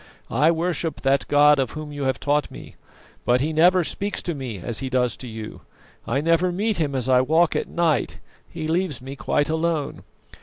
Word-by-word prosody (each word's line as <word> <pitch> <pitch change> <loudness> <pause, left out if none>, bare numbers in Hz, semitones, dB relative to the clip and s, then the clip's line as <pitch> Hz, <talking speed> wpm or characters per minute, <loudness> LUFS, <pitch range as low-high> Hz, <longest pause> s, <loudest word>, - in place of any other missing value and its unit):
I 145 +7 +3
worship 165 -2 -1
that 135 0 +1
God 145 0 +5
of 130 -4 -1
Whom 155 -1 -6
you 145 -1 -4
have 130 -1 0
taught 145 +1 0
me, - - -11 0.5
but 125 +1 +3
He 155 +4 -1
never 175 +3 +5
speaks 200 +5 -3
to 175 - -2
me 130 -7 -5
as 110 +5 -3
He 135 - -4
does 125 -2 +1
to 130 - -8
you. 110 -1 -8 0.5
I 135 +4 0
never 165 +3 +2
meet 210 +4 -1
Him 145 -4 -1
as 130 -2 -1
I 130 -1 +5
walk 160 +5 +2
at - - -1
night; 170 -3 0 0.3
He 160 -2 -5
leaves 165 -3 -1
me 135 +2 -8
quite 145 +1 0
alone. 160 -2 -1
150 Hz, 200 wpm, -23 LUFS, 130-165 Hz, 0.5 s, God